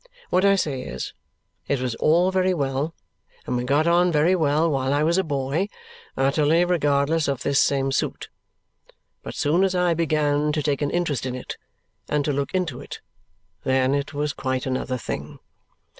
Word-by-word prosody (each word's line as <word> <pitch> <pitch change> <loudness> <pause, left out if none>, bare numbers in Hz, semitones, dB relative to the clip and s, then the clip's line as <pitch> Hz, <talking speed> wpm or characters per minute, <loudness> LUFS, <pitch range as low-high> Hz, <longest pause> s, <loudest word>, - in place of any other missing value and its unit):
What 185 - +3
I 200 0 +5
say 145 -9 -1
is, - - -6 0.5
it 140 - 0
was 125 -2 -2
all 170 +9 +3
very 185 -1 +2
well 140 +2 -2 0.5
and - - -2
we 125 - -1
got 140 +5 +2
on 175 +1 +4
very 160 +4 +3
well 155 -1 +2
while 135 -4 0
I 145 - +2
was 170 +4 +2
a - - +2
boy, 145 +4 -1 0.5
utterly 150 +5 +3
regardless 150 -2 +1
of 140 -3 -2
this 140 -1 +3
same 135 -1 +1
suit; - - -2 0.9
but - - -8
as - - -6
soon 165 +6 +2
as 190 -1 +1
I 180 -1 +2
began 150 -2 +1
to 150 -1 -1
take 145 -1 0
an 145 - +1
interest 155 -7 -1
in 125 - -3
it 125 - -6 0.5
and 150 -1 0
to 145 - 0
look 140 0 -2
into 185 -3 -1
it, - - -8 0.6
then 130 0 +2
it 140 0 -1
was 145 0 -2
quite 130 -1 -2
another 130 -1 -2
thing. 120 - -6
145 Hz, 185 wpm, -23 LUFS, 135-170 Hz, 0.9 s, I